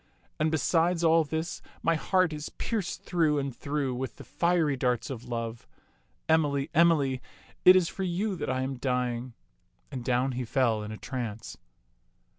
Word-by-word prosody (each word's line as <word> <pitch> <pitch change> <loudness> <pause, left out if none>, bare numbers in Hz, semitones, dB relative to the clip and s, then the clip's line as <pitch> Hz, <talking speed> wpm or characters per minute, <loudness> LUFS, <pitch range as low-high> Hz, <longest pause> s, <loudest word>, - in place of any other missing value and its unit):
And 155 +1 +2
besides 165 +3 +2
all 165 0 +5
this, 160 +2 -4 0.2
my 165 - +3
heart 180 +1 +2
is 150 0 -5
pierced 215 -6 -3
through 160 -4 +2
and 140 -3 -2
through 140 -2 -2
with 130 +1 -4
the - - -11
fiery 170 -4 +1
darts 125 -1 0
of 120 -1 -7
love. 115 -1 -4 0.6
Emily, 150 -2 +2
Emily, 150 -6 +3 0.4
it 185 - +10
is 185 -2 +4
for 195 - -6
you 190 +3 -1
that - - -3
I 130 0 0
am 135 0 -3
dying 125 -1 -1 0.3
"; 90 - -41
and 130 -3 -5
down 125 +2 +1
he 125 0 -3
fell 115 -3 +1
in 105 0 -6
a 110 - -6
trance. 115 -4 -5
140 Hz, 170 wpm, -28 LUFS, 125-165 Hz, 0.6 s, it